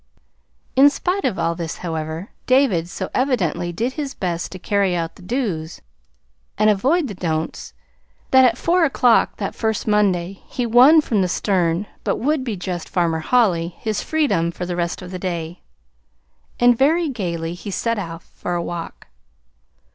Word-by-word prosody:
In 275 +2 +7
spite 360 +6 -2
of 195 - 0
all 165 - 0
this, 165 -1 -5
however, 160 +3 -4 0.2
David 255 -11 +3
so 190 0 -5
evidently 175 - 0
did 235 +9 -2
his 285 -2 -5
best 175 -2 -3
to 185 - -7
carry 195 0 +1
out 165 -1 -2
the - - -16
"dos" 180 -7 -3 0.8
and 215 0 +4
avoid 280 - +1
the 210 - -6
"don'ts," 160 -3 -3 0.6
that 260 0 +7
at 245 -2 +4
four 345 +4 +2
o'clock 250 -6 +3
that 195 - -3
first 220 -2 -2
Monday 195 -3 +1
he 245 - -3
won 255 +7 +7
from 220 -8 0
the 185 - +2
stern 180 0 0 0.2
but - - 0
would 290 +2 0
be 225 -6 -3
just 180 -1 -5
Farmer 170 -3 0
Holly 175 -4 +1
his 215 -2 -2
freedom 210 - +1
for 180 +1 -5
the 175 0 -3
rest 170 +1 -2
of 180 - -9
the 185 - -5
day; 175 -2 -4 1.0
and 245 0 +5
very 315 +7 +3
gayly 170 - -3
he 180 +4 -8
set 230 +3 -1
off 165 -3 -6
for 175 - -5
a 170 - -1
walk. 170 -1 -6
195 Hz, 170 wpm, -21 LUFS, 170-250 Hz, 1.0 s, In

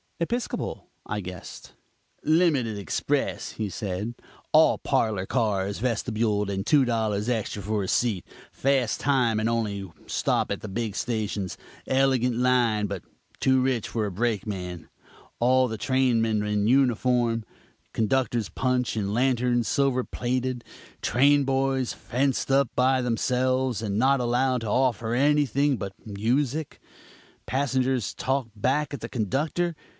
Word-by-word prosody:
"Episcopal?" 235 +8 -3 0.2
I 105 - -3
guessed. 90 -2 -9 0.5
"Limited 150 - +2
express!" 100 -5 -2
he 110 -2 -3
said, 100 +3 -4 0.4
"all - - +5
parlor 105 -4 0
cars, 100 -4 0
vestibuled, 110 -3 0
and 95 0 -2
two 140 +1 +4
dollars 110 -3 0
extra 110 -4 -2
for 105 +1 -1
a - - -4
seat; 110 -6 0 0.3
fast 135 -4 +1
time, 125 -6 +2
and 110 +1 +1
only 100 -5 -2 0.2
stop - - 0
at - - -3
the - - -6
big 110 0 -3
stations. 105 -5 -2 0.3
Elegant 130 -2 +2
line, 120 -4 +2
but 100 -3 -5 0.4
too 130 -1 +3
rich 130 -3 0
for 110 -2 -1
a 100 - -3
brakeman. 95 -5 -3 0.5
All 130 +2 +4
the 110 -2 -4
trainmen 115 -4 +1
in 105 0 0
uniform; 120 -2 +2 0.5
conductor's 120 0 0
punch 125 -2 0
and 100 -2 -1
lanterns 125 -1 +2
silver 135 -3 +1
plated; 125 0 -2 0.4
train 140 +3 +4
boys 135 -1 0
fenced 135 +2 -1
up 135 -2 +3
by 130 +1 +3
themselves 125 0 0
and 100 -3 -2
not 135 +4 +3
allowed 125 +1 +1
to 115 - -4
offer 120 0 +1
anything 145 0 +2
but 100 -2 -5
music. 125 +8 -1 0.7
Passengers 130 -3 0
talk 135 -2 -1
back 135 +7 0
at 140 - -5
the - - -5
conductor. 150 - -1
120 Hz, 130 wpm, -26 LUFS, 105-130 Hz, 0.7 s, all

